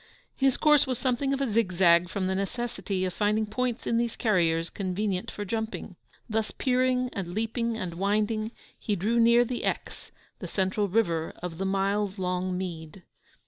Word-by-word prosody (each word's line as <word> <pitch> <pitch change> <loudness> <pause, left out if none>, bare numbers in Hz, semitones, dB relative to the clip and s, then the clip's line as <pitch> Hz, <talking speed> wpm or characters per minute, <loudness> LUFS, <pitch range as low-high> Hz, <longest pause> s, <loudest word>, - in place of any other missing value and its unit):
His 270 -1 +2
course 300 -3 +5
was 255 -2 -1
something 260 +1 0
of 275 0 0
a 275 - +1
zigzag 185 -6 +3
from 190 0 -2
the 190 - 0
necessity 200 -1 -2
of 185 - -3
finding 210 +2 +1
points 245 +2 -2
in 230 - +1
these 235 -1 0
carriers 170 -7 +1
convenient 190 0 -2
for 205 - -5
jumping. 220 -2 -4 0.3
Thus 220 -1 -1
peering 255 -1 +1
and 175 -2 -4
leaping 225 +1 -1
and 185 -6 -4
winding, 210 +4 0 0.3
he 210 - -1
drew 215 +6 +1
near 235 +1 +6
the 245 0 -4
Exe, - - -4 0.3
the - - -5
central 195 +2 0
river 170 -6 0
of 170 -2 -5
the 195 - -1
miles 195 +1 0
long 180 0 -1
mead. 175 -1 -6
210 Hz, 170 wpm, -28 LUFS, 185-235 Hz, 0.3 s, near